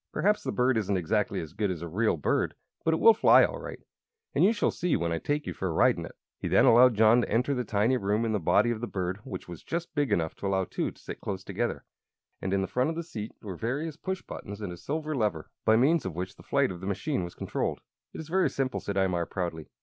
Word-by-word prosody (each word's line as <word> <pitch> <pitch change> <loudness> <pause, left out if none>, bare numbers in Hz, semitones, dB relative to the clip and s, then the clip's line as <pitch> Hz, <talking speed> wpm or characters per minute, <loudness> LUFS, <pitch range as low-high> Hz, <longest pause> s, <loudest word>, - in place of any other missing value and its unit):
Perhaps 210 +2 +2
the - - -3
bird 125 -1 +2
isn't 100 -2 0
exactly 105 +4 0
as 80 - -9
good 105 -2 -1
as 85 -3 -4
a - - -4
real 100 +3 +1
bird, 75 - 0 0.3
but 165 - +2
it 160 - +1
will 225 - +8
fly 220 - +6
all - - -5
right, - - -7 0.6
as - - +1
you 195 - +6
shall 225 - +1
see 175 -2 0
when 85 0 -1
I 85 - -1
take 150 - -1
you - - -4
for 95 - -3
a - - -1
ride 80 - +4
in - - -6
it." - - -14 0.2
He - - -3
then - - +5
allowed 120 +1 +7
John 110 +3 +5
to - - -3
enter 125 +6 +1
the 125 -2 -1
tiny 110 +3 +1
room 105 +2 0
in 115 - 0
the 105 - +1
body 120 +7 +3
of 115 -1 -3
the 120 - -2
bird, 95 -2 -3
which 95 - -7
was 85 -1 -9
just 170 +1 -4
big 145 -6 0
enough 80 -5 +1
to 100 - -3
allow 95 -1 +1
two - - -2
to - - -16
sit - - -8
close 95 -1 -4
together. - - -3 0.6
And 95 - -2
in 95 0 +1
front 125 +8 0
of 165 - -3
the 170 - -3
seat 110 -10 -7
were 95 -4 -5
various 140 - -3
push 190 +3 -4
buttons 100 +1 -8
and 100 -4 -5
a - - -9
silver 155 - -3
lever, 105 - -1
by 110 - +5
means 145 +8 +3
of 90 -4 -5
which 90 +2 -4
the - - -15
flight 140 -4 +1
of 90 -1 -8
the 95 - -5
machine 100 - -1
was 85 - -7
controlled. - - -2 0.3
"It - - -9
is 160 - -7
very 185 +3 +2
simple," 135 -1 -2
said 100 - -4
Imar, 90 -3 0
proudly. 85 -4 -4
110 Hz, 270 wpm, -28 LUFS, 95-140 Hz, 0.6 s, will